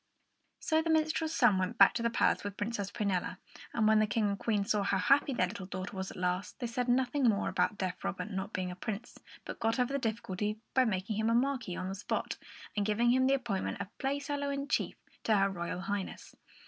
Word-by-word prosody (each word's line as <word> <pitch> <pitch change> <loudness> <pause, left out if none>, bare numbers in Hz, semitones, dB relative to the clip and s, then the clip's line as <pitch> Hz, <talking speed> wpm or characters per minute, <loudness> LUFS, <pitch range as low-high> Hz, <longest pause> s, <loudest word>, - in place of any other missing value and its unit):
So 315 0 +2
the 325 - -3
minstrel's 315 0 +1
son 190 -2 +5
went 195 +5 -1
back - - +8
to - - -2
the 235 - +2
palace - - +2
with 205 -1 -5
Princess 205 -2 -2
Prunella; 195 -5 -1 0.3
and 220 -2 +2
when 220 0 +5
the 215 - +3
King 210 0 +1
and 200 -1 -2
Queen 210 -3 +1
saw 210 0 +1
how 195 0 +1
happy 275 +8 +4
their 235 -8 +2
little 190 0 -7
daughter 185 +1 -5
was 190 0 -3
at - - -10
last, 180 +1 -1
they 250 - -2
said 245 +1 -2
nothing 260 +2 +2
more 205 -2 +1
about 210 - +1
deaf 185 -2 -3
Robert 200 +4 -3
not 190 +1 -3
being 180 0 -2
a - - -7
prince, 215 +4 -6 0.3
but - - -6
got 225 +1 +1
over 250 +2 +1
the 280 - +1
difficulty 215 -3 -2 0.2
by 260 -1 +4
making 205 -1 -1
him 220 +1 +1
a 230 - +3
Marquis 245 -7 0
on 185 - -3
the 190 - -3
spot 195 - -3 0.4
and 205 - +1
giving 220 +3 +3
him 260 +1 +4
the 275 - +4
appointment 220 -9 -2
of 200 +2 -6
Playfellow 285 +1 -1
in 280 0 -2
chief - - 0 0.3
to 215 -2 +4
her 195 0 +4
Royal 175 0 -4
Highness. 200 -1 -4
215 Hz, 230 wpm, -32 LUFS, 195-250 Hz, 0.4 s, back